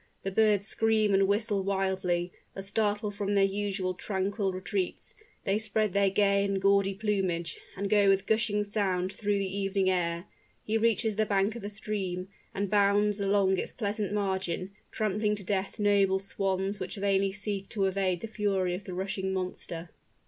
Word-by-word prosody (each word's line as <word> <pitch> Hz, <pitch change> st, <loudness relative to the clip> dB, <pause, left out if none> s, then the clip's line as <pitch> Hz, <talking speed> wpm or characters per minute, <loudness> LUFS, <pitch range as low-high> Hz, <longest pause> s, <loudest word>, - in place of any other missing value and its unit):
The 195 Hz, -, -2 dB
birds 210 Hz, -1 st, +3 dB
scream 215 Hz, -1 st, +2 dB
and 195 Hz, 0 st, +4 dB
whistle 205 Hz, 0 st, +1 dB
wildly, 190 Hz, -2 st, 0 dB, 0.2 s
as 195 Hz, 0 st, -6 dB
startled 210 Hz, 0 st, 0 dB
from 200 Hz, 0 st, -1 dB
their 200 Hz, -, +5 dB
usual 195 Hz, -1 st, -1 dB
tranquil 195 Hz, +1 st, -1 dB
retreats, 185 Hz, 0 st, -3 dB, 0.3 s
they 200 Hz, +1 st, +1 dB
spread 215 Hz, -2 st, 0 dB
their 200 Hz, -1 st, +4 dB
gay 200 Hz, 0 st, +3 dB
and 195 Hz, -1 st, 0 dB
gaudy 195 Hz, 0 st, +3 dB
plumage, 190 Hz, -5 st, -1 dB, 0.2 s
and 200 Hz, +1 st, -1 dB
go 205 Hz, -1 st, +4 dB
with 195 Hz, 0 st, +3 dB
gushing 215 Hz, -1 st, +1 dB
sound 195 Hz, -3 st, -1 dB
through 205 Hz, -1 st, 0 dB
the 195 Hz, -1 st, -2 dB
evening 195 Hz, -1 st, +1 dB
air. 170 Hz, -1 st, -1 dB, 0.4 s
He 215 Hz, -, -1 dB
reaches 225 Hz, -1 st, +2 dB
the 215 Hz, -1 st, +2 dB
bank 200 Hz, +2 st, +1 dB
of 235 Hz, -, -7 dB
a 205 Hz, -, -3 dB
stream, 195 Hz, -4 st, -4 dB, 0.2 s
and 200 Hz, +1 st, -2 dB
bounds 205 Hz, +1 st, +3 dB
along 195 Hz, -1 st, +3 dB
its -, -, -4 dB
pleasant 210 Hz, -2 st, -2 dB
margin, 190 Hz, -2 st, -1 dB, 0.2 s
trampling 210 Hz, 0 st, 0 dB
to 205 Hz, -, -8 dB
death 195 Hz, +1 st, -2 dB
noble 200 Hz, -2 st, +3 dB
swans 195 Hz, 0 st, -2 dB
which 185 Hz, +2 st, -5 dB
vainly 195 Hz, -1 st, +1 dB
seek 195 Hz, 0 st, -3 dB
to 200 Hz, -3 st, 0 dB
evade 190 Hz, -2 st, 0 dB
the 225 Hz, -, -4 dB
fury 200 Hz, -4 st, 0 dB
of 185 Hz, +3 st, -5 dB
the 180 Hz, -, -6 dB
rushing 190 Hz, 0 st, -2 dB
monster. 180 Hz, -2 st, -4 dB
195 Hz, 170 wpm, -29 LUFS, 190-205 Hz, 0.4 s, their